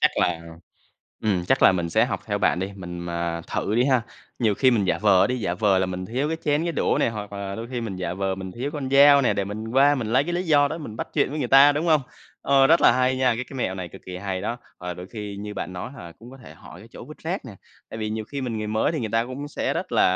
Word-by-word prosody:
chắc - - +5
là, 85 -2 +1 0.8
ừm, 95 -5 0
chắc 135 - +2
là - - +7
mình 85 -2 -2
sẽ - - +4
học - - -3
theo - - -1
bạn 85 - +2
đi, 95 +2 -3
mình 90 -2 -7
mà 85 -1 -3
thử 105 - -1
đi 120 +2 +3
ha. 130 -4 +3 0.4
Nhiều 110 -4 +2
khi 130 +5 +4
mình 110 -5 +2
giả - - +1
vờ 100 -3 +4
đi, 125 0 -2
giả 90 -4 -1
vờ 100 -1 +2
là 95 - +1
mình 90 0 -5
thiếu 130 +6 -1
cái 160 - -1
chén 150 +1 +2
cái 170 - -1
đũa - - +1
nè, - - +3
hoặc 105 -2 -6
là 100 -1 -5
đôi 115 +3 -6
khi 120 - -2
mình 105 -5 -5
giả 90 -1 -3
vờ 95 0 -1
mình 95 -1 -7
thiếu 130 +5 -4
con 135 -3 -4
dao 140 0 +7
nè, 125 - +3
để 100 - -1
mình 110 +3 -6
qua 140 +4 +4
mình 125 -6 -3
lấy 135 +3 +4
cái 175 - -3
lý 175 +1 0
do 145 -4 +3
đó 160 +3 -5
mình 115 -8 -8
bắt - - -4
chuyện - - +2
với 155 - -4
người 130 -5 -2
ta, 135 +3 +7
đúng 150 +4 -2
hông? 155 -2 +4 0.4
Ờ, 135 -1 +4
rất 165 +4 +5
là - - +6
hay 130 0 +1
nha, 130 -2 +2
cái 125 - -3
cái 135 - -9
mẹo 95 -6 -1
này 90 -2 -6
cực 95 - -13
kì 90 - -6
hay 95 0 -4
đó, 115 +4 -3 0.2
và 90 0 -5
đôi 90 +1 -9
khi 105 -2 -7
như 105 +1 -6
bạn 95 - -5
nói 90 +7 -6
hoặc 125 - -10
là 85 - -10
cũng 120 +7 -15
có 135 - -12
thể 125 - -13
hỏi - - -13
cái - - -14
chỗ - - -10
vứt - - -12
rác - - -4
nè, - - -9 0.4
tại - - -7
vì 110 -1 -3
nhiều 110 0 -3
khi 140 +4 -6
mình 120 -4 -3
người 110 - -3
mới 110 +8 0
thì 155 - -2
người 110 -3 -3
ta 115 +1 +2
cũng 135 +3 -6
sẽ - - -2
rất - - -4
là, - - +4
110 Hz, 315 wpm, -24 LUFS, 95-135 Hz, 0.8 s, là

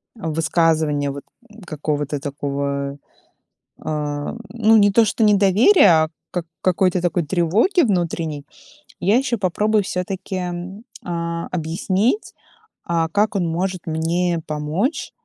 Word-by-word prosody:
высказывания 160 -4 0
вот 140 0 -8 0.4
какого-то 150 -2 -3
такого, 140 -1 -3 0.8
а, 145 -1 -3 0.2
ну 225 -1 +4
не 205 -1 +5
то 230 +3 +5
что 220 - -1
недоверия, 200 - +5
а - - -5 0.2
как 175 -2 -3 0.2
какой-то 185 0 +2
такой 175 -1 0
тревоги 190 - +2
внутренней, 170 - -1 0.6
я 200 +6 +3
ещё 255 -2 0
попробую 210 +2 +1
всё-таки, 185 0 -4 0.6
а, 170 -1 -3
объяснить, 185 - -1 0.5
а, 165 -1 0
как 205 +4 +1
он 180 -3 0
может 180 +2 -3
мне 165 +2 0
помочь 155 - -2
170 Hz, 110 wpm, -21 LUFS, 155-200 Hz, 0.8 s, не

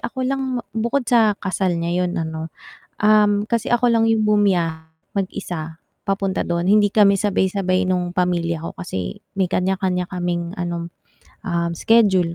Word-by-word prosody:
ako 260 +1 -4
lang 270 +1 -1
bu 245 - -1 0.3
bukod 275 +1 0
sa 225 -4 +3
kasal 185 -2 -1
niya 170 +2 0
'yun 180 +1 -3
ano, 160 -1 -4 0.5
um, 210 -1 +3
kasi 230 -1 -1
ako 240 0 +3
lang 230 -1 +3
'yung 220 -1 +2
bumiyahe 170 -6 +1 0.3
mag-isa 165 -4 -4 0.2
papunta 195 -1 -1
do'n, 170 0 -2
hindi 205 +1 +4
kami 200 -2 +5
sabay-sabay 190 -1 0
nung 180 -1 0
pamilya 175 -2 0
ko - - -7
kasi 95 - -5 0.2
may 190 - +3
kanya-kanya 180 0 -1
kaming 175 -2 -2
ano, 170 -1 -4 0.6
um, 170 -2 0
schedule 190 -3 +3
185 Hz, 150 wpm, -21 LUFS, 175-210 Hz, 0.6 s, kami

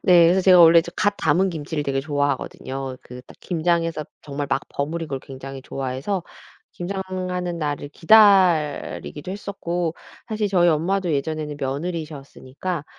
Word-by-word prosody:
네. 175 -3 +7
그래서 185 +2 +3
제가 185 -1 +7
원래 165 0 +8 0.2
갓 205 +2 +2
담은 175 +5 +2
김치를 155 -2 -4
되게 135 -1 0
좋아하거든요. 135 -2 -3
그 125 0 -10
딱 - - -15
김장에서 165 -2 0 0.2
정말 145 -1 -4
막 135 - +2
버무린 160 +3 -3
걸 135 -2 -3
굉장히 135 0 -9
좋아해서 135 +10 -3 0.5
김장하는 185 -1 -4
날을 145 -2 -3
기다리기도 180 -4 +3
했었고 175 -4 -3 0.3
사실 215 -1 -1
저희 175 -3 +4
엄마도 175 +3 +1
예전에는 150 +1 -2
며느리셨으니까 150 +1 -5
165 Hz, 340 characters per minute, -22 LUFS, 145-180 Hz, 0.5 s, 원래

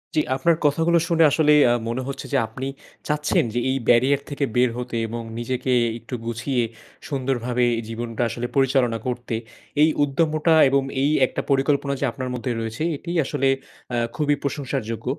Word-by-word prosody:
জি, 155 - +4
আপনার 165 +5 +3
কথাগুলো 165 +4 +3
শুনে 165 -1 +4
আসলেই 150 -1 +5
আ - - +4 0.2
মনে 120 +3 -2
হচ্ছে 140 0 -5
যে, - - +4
আপনি 125 +4 -6 0.4
চাচ্ছেন 150 0 +1
যে 120 - 0
এই 135 - +1
barrier 130 +4 +4
থেকে 145 -1 -1
বের 125 0 +4
হতে। 125 -1 -5
এবং 115 +1 -5 0.2
নিজেকে 130 +2 -2 0.3
একটু 115 +2 -7
গুছিয়ে 120 +2 -1 0.5
সুন্দরভাবে 125 -3 0 0.2
জীবনটা 115 0 -4
আসলে 120 +2 -4
পরিচালনা 135 -4 +2
করতে। 120 -2 -3 0.5
এই 155 - +6
উদ্যমটা 155 +3 +2 0.2
এবং 135 0 +2 0.2
এই 140 - +3 0.2
একটা - - -3
পরিকল্পনা 140 +1 +2
যে - - 0
আপনার 130 -1 -5
মধ্যে 125 +1 -3
রয়েছে 115 +6 -4
এটিই 170 +4 -4
আসলে 135 -1 0 0.5
আ - - +1 0.2
খুবই 145 -1 +1
প্রশংসার 140 -2 -2
যোগ্য। 115 - -6
135 Hz, 165 wpm, -23 LUFS, 120-145 Hz, 0.5 s, এই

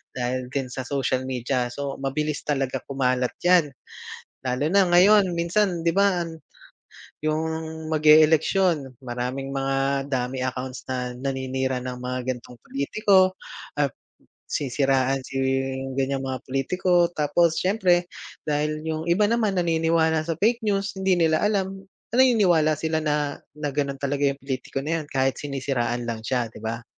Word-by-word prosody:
dahil 125 0 -2
din 130 -1 -3
sa 130 +1 -5
social 130 -2 -1
media 125 0 -1
so 140 +3 -5
mabilis 145 +2 -2
talaga 135 -3 0
kumalat 130 -2 0
yan. 175 -3 +5 0.8
Lalo 130 +4 0
na 200 +1 +5
ngayon 190 +4 +6
minsan 170 +1 +1
'di 170 - +2
ba, 195 -1 +2
an 165 -1 -7 0.8
yung, 155 +1 0 0.5
mag-e 155 0 +7
eleksyon, 160 -3 +1
maraming 125 +2 -4
mga 135 0 0
dummy 130 -1 -2
accounts 130 0 -4
na 125 -1 -2
naninira 130 0 -2
ng 125 0 -6
mga 125 0 -3
gantong 125 0 -13
pulitiko, 185 +6 +2 0.4
at 140 -3 +1 0.6
sisiraan 135 -1 +1
si 135 - -6 0.6
ganyang 135 0 0
mga 130 -1 -4
pulitiko 175 +6 +1
tapos 155 +2 +2
siyempre 185 -2 +2 0.4
dahil 150 +1 -1
yung 160 0 -3
iba 175 +5 +3
naman 220 -2 +1
naniniwala 165 -2 +2
sa 165 - -1
fake 225 +8 +2
news, 200 -1 0
hindi 190 -1 +3
nila 160 -2 +3
alam, 195 -2 -1 0.2
na - - -3
naniniwala 180 -12 +4
sila 160 +1 -1
na 150 -2 -1 0.2
na 150 -1 -3
ganon 140 0 -1
talaga 140 0 +1
yung 140 0 -2
pulitiko 135 0 -4
na 165 +3 -1
yan - - -10
kahit 135 0 0
sinisiraan 130 -4 -2
lang 115 -1 -3
siya, 120 -3 -1
'di - - -12
ba? 115 +1 -4
145 Hz, 145 wpm, -24 LUFS, 130-170 Hz, 0.8 s, mag-e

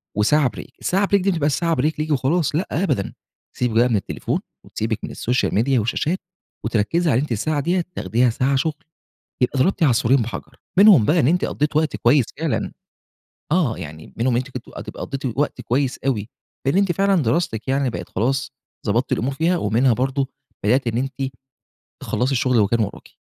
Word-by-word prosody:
وساعة 130 +6 +3
Break - - -7
الساعة 195 +2 +1
Break 200 - +5
دي 195 - +1
ما 175 - -1
تبقاش 150 -1 +1
ساعة 165 +1 +1
Break 150 +3 +1
ليكِ 155 0 -1
وخلاص، 145 +3 +1
لأ، 175 +6 0
أبدًا، 160 - 0 0.4
تسيبِك 120 0 +2
من - - +3
التليفون، 100 - -2 0.2
وتسيبِك 110 -1 -3
من - - -4
الSocial 125 +2 0
Media 125 +4 +2
والشاشات، 150 - -1 0.5
وتركزي 120 +9 +1
على 125 - +3
أنتِ 150 - -4
الساعة 145 +7 0
دية 175 +4 0
تاخديها 115 +7 +2
ساعة 130 +4 +1
شُغل، 150 +2 -1 0.6
يبقى 130 +2 +1
ضربتِ 180 +6 +2
عصفورين 130 -2 +4
بحجر؛ 115 - -7 0.2
منهم 195 - +8
بقى 165 +9 +3
إن 130 - +3
أنتِ 180 +3 +2
قضيتِ 150 +1 -1
وقت 155 -2 +1
كويس 125 +1 +4
فعلًا 160 -1 -1 0.8
آه، 155 -10 +2
يعني 80 +1 -9
منهم 120 +1 +1
أنتِ 130 +2 -2
كنتِ 125 -2 -7 0.2
تبقي - - -8
قضيتِ 135 0 -4
وقت 145 - 0
كويس 130 +1 0
أوي، 110 -6 0 0.4
لإن 135 - +2
أنتِ 195 -3 +2
فعلًا 195 -2 +2
دراستِك 115 -2 -1
يعني 135 -1 +1
بقت - - -6
خلاص 135 +6 -1 0.3
ضبطتِ 115 +5 +1
الأمور 135 +4 0
فيها، 165 +5 +1
ومنها 120 0 +2
برضه 135 +3 0 0.4
بدأتِ 125 +4 +2
إن 115 +1 0
أنتِ 135 0 -3 0.7
تخلّصي 125 +3 0
الشُّغل 125 -1 +2
اللي 105 -3 +4
كان 115 +2 +1
ورَاكِ. 105 -2 -4
135 Hz, 185 wpm, -21 LUFS, 115-155 Hz, 0.8 s, منهم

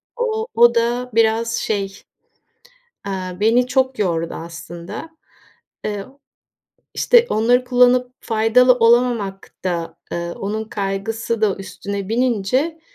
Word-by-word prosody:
o 450 -2 -2
o 235 +1 +6
da 240 +2 0
biraz, 225 +1 +2
şey, 205 -2 -1 1.2
eee, 185 -2 -4
beni 235 +4 +3
çok 260 0 0
yordu 170 -5 -1
aslında. 170 - -8 0.8
Iıı, 210 +6 -6 0.8
işte 480 -1 +4
onları 245 +3 +3
kullanıp 250 0 +3
faydalı 225 +3 +4
olamamak 230 -4 +2
da, 170 -2 -3 0.2
ııı, 170 0 -3
onun 215 +2 -3
kaygısı 220 +3 -3
da 205 -3 +2
üstüne 200 0 -6
binince 250 +7 0
225 Hz, 105 wpm, -20 LUFS, 195-250 Hz, 1.2 s, o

